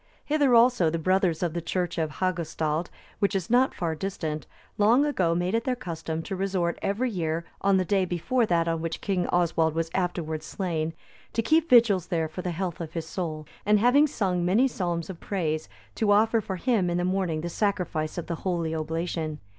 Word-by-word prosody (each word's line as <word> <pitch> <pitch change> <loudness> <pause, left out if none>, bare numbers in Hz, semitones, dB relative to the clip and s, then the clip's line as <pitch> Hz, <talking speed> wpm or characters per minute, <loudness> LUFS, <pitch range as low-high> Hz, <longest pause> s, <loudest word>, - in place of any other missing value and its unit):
Hither 290 -4 +3
also 235 -7 +5
the 165 - -1
brothers 185 0 +1
of 170 -3 -1
the 170 - -2
church 175 +1 -2
of 155 -2 -1
Hagustald,(291) 170 -3 -1 0.3
which 200 0 +1
is 190 +1 -2
not 255 +2 +4
far 170 -3 -1
distant, 155 -4 -4 0.3
long 235 +7 +5
ago 180 - +1
made 175 +2 0
it 230 0 +1
their 255 0 0
custom 165 -7 -5
to 195 - -4
resort 185 -3 -1
every 235 +5 0
year, 165 -3 -2 0.2
on 195 -1 +3
the 185 - +1
day 190 +1 +2
before 220 +8 0
that 170 -2 +2
on 165 -1 -1
which 165 0 -3
King 190 -3 -1
Oswald 165 -2 +1
was 165 0 -1
afterwards 160 -4 -2
slain, 165 -4 -2 0.4
to 230 - 0
keep 320 +7 +3
vigils 220 -8 +5
there 165 -3 0
for 160 +4 -6
the 180 - -3
health 175 0 -3
of 165 -1 -6
his 165 -2 -3
soul, 160 -3 -4 0.2
and 210 +1 +4
having 250 +8 +5
sung 190 -10 -1
many 205 +9 +4
psalms 175 -8 -2
of 180 -3 -8
praise, 160 -6 -2 0.2
to 215 -2 +1
offer 220 +2 +4
for 190 -2 -4
him 200 -2 +1
in 175 - 0
the 175 - 0
morning 185 -4 0
the 170 - -3
sacrifice 180 -5 -1
of 175 - -3
the 170 - -4
Holy 170 -4 -1
Oblation. 160 0 -3
180 Hz, 200 wpm, -26 LUFS, 165-200 Hz, 0.4 s, also